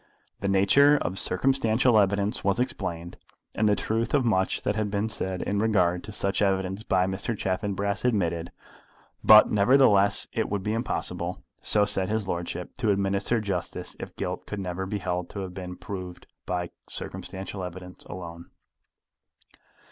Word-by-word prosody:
The 100 - -2
nature 120 +10 +5
of 95 +2 -2
circumstantial 125 -3 +2
evidence 100 +1 +1
was 100 +3 +1
explained, 90 -9 -3 0.4
and 105 +1 +2
the 105 - +4
truth 115 +5 -1
of 135 -3 +2
much 95 -5 +1
that 105 - 0
had 110 -1 -1
been 100 +2 -1
said 95 -3 -3
in 100 0 -1
regard 90 -5 +2
to 110 - -8
such 100 -1 0
evidence 95 0 0
by 95 -4 +1
Mr. 95 +4 -3
Chaffanbrass 100 +1 -2
admitted; 85 -8 0 0.7
but, 110 0 +8
nevertheless, 105 -2 +4
it - - -1
would 100 -2 -2
be 105 - -1
impossible, 90 -6 -2 0.2
so 105 -1 +3
said 100 -2 +2
his 110 -2 -1
lordship, 85 0 -4
to 120 -4 0
administer 100 +3 +1
justice 100 -5 -4
if - - -8
guilt - - -4
could 105 - -4
never 95 0 -4
be 105 - -2
held 90 -2 -3
to 100 - -6
have 95 -1 -6
been 90 -1 -7
proved 90 -1 -7 0.2
by 90 -1 -2 0.2
circumstantial 95 0 -6
evidence 90 0 -8
alone. 85 -1 -9
100 Hz, 155 wpm, -26 LUFS, 90-105 Hz, 0.7 s, but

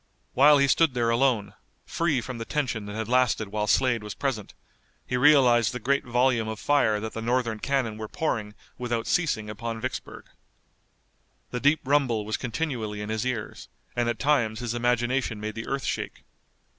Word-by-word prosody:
While 145 +3 +7
he 140 0 +4
stood 155 -1 +3
there 115 -1 +1
alone, 120 -4 +1 0.3
free 155 -7 0
from 125 0 -7
the - - -3
tension 120 -8 -2
that 105 - -6
had 110 -1 -3
lasted 120 -4 +2
while 105 +1 -2
Slade 125 -2 +2
was 105 -1 -7
present, 130 -8 -3 0.5
he - - -2
realized 125 -5 +5
the 125 - -4
great 140 +4 +1
volume 120 -2 +1
of 110 0 -5
fire 115 -8 +2
that 110 +1 -5
the 115 - -5
Northern 120 -1 0
cannon 125 -6 -1
were 110 - -5
pouring 110 -7 -2 0.2
without 120 -2 -2
ceasing 120 -11 0
upon 115 +2 -5
Vicksburg. 130 +3 -6 1.3
The 125 - -2
deep 145 +4 +3
rumble 130 -6 +1
was 110 - -2
continually 120 -5 -3
in 105 - -5
his 110 +3 -1
ears, 120 -4 -5 0.3
and 120 -1 +1
at 120 - -2
times 120 -7 +1
his 120 -2 -3
imagination 120 -1 0
made 110 +1 -4
the 115 +1 -6
earth 135 -1 -2
shake. - - -4
120 Hz, 180 wpm, -26 LUFS, 110-135 Hz, 1.3 s, While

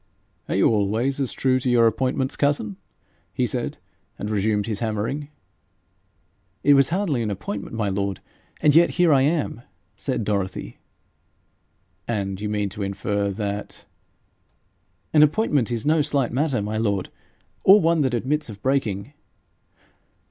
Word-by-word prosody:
'Are - - 0
you - - +4
always 110 +6 +1
as 135 -3 -1
true 130 -1 +1
to 130 - -1
your 120 -1 +5
appointments, 130 +3 0
cousin?' 140 -9 0 0.6
he - - +1
said, - - -3 0.4
and 105 - -4
resumed 105 0 +1
his 105 -2 -3
hammering. 115 +6 -2 1.4
'It 145 - +6
was 135 -1 +5
hardly 170 -8 0
an 110 - -1
appointment, 100 +2 -5
my 110 -2 -1
lord, 100 -1 -2 0.4
and 150 - +5
yet 170 +1 +6
here 175 -3 +4
I 135 - +4
am,' 145 -4 0 0.3
said 125 -5 -2
Dorothy. 100 -3 -3 1.3
'And 100 -4 -2
you 105 - -2
mean 105 -1 -1
to 105 +2 -8
infer 100 +1 -1
that 100 0 -5 0.6
?' - - -44
'An 150 - +6
appointment 150 - +3
is 115 -2 -3
no 155 +1 +3
slight 140 -4 0
matter, 135 -4 0
my 105 +1 -3
lord, 100 -4 -1 0.5
or 195 +2 +8
one 165 -3 +2
that 130 -3 +1
admits 145 +4 -1
of 105 -2 -9
breaking.' 125 -4 -1
115 Hz, 150 wpm, -23 LUFS, 105-140 Hz, 1.4 s, or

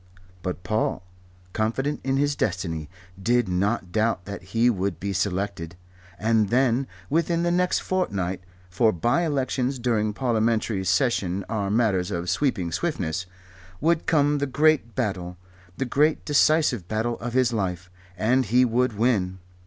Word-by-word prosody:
But 90 -1 -4
Paul, 110 -3 -1 0.5
confident 135 +7 -1
in 135 0 0
his 145 0 +1
destiny, 85 - -2 0.3
did 120 +2 +2
not 95 +1 -1
doubt 110 -4 0
that 100 0 -6
he 115 +6 +1
would 100 -5 0
be 100 0 -3
selected. 95 -3 -2 0.4
And 110 -1 +2
then, 130 +1 +2 0.2
within 170 +2 +1
the 175 - +1
next 180 +1 +1
fortnight 95 - -1 0.3
for 110 +5 +3
bye 120 - +1
elections 135 -2 -1
during 115 -3 0
a - - -4
Parliamentary 110 -3 0
session 100 -7 +1
are 105 -3 -2
matters 100 -4 +1
of 90 -2 -2
sweeping 95 - 0
swiftness 90 - -2 0.5
would 165 +1 +1
come 145 -2 +3
the 145 - 0
great 145 -3 +2
battle, 95 -7 -2 0.4
the 135 - -1
great 150 +5 +1
decisive 145 - +3
battle 110 +3 -2
of 120 0 -5
his 125 -2 +2
life, 90 -4 -3 0.3
and 125 +5 +2
he 125 +4 +4
would 120 -1 0
win. 100 -6 +1
115 Hz, 145 wpm, -25 LUFS, 95-130 Hz, 0.5 s, he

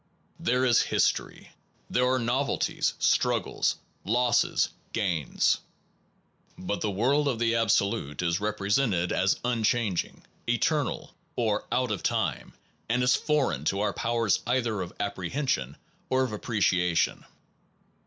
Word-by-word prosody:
There 125 +2 +1
is 120 -3 +5
history. - - -1 0.4
There 125 +1 +2
are 130 - +2
novelties, 125 +3 0
struggles, - - +1 0.3
losses, 120 +3 +2 0.2
gains. 85 - +1 1.0
But 100 +2 -3
the 105 - 0
world 130 +9 +1
of 130 -4 0
the 115 0 +1
Absolute 100 -9 +1
is 85 0 +1
represented 105 -2 0
as 95 +1 +1
unchanging, 115 -5 0 0.3
eternal, 155 +5 0 0.2
or 110 -4 0
out 125 -3 +1
of 100 - -2
time, - - -1 0.4
and 125 +2 +2
is 125 +1 +4
foreign 135 - 0
to 95 +4 0
our 105 -1 0
powers 115 -3 +1
either 120 -5 0
of 90 -1 -5
apprehension 100 - -2 0.3
or 130 0 +2
of 130 - -2
appreciation. 95 -6 +1
115 Hz, 120 wpm, -27 LUFS, 95-125 Hz, 1.0 s, is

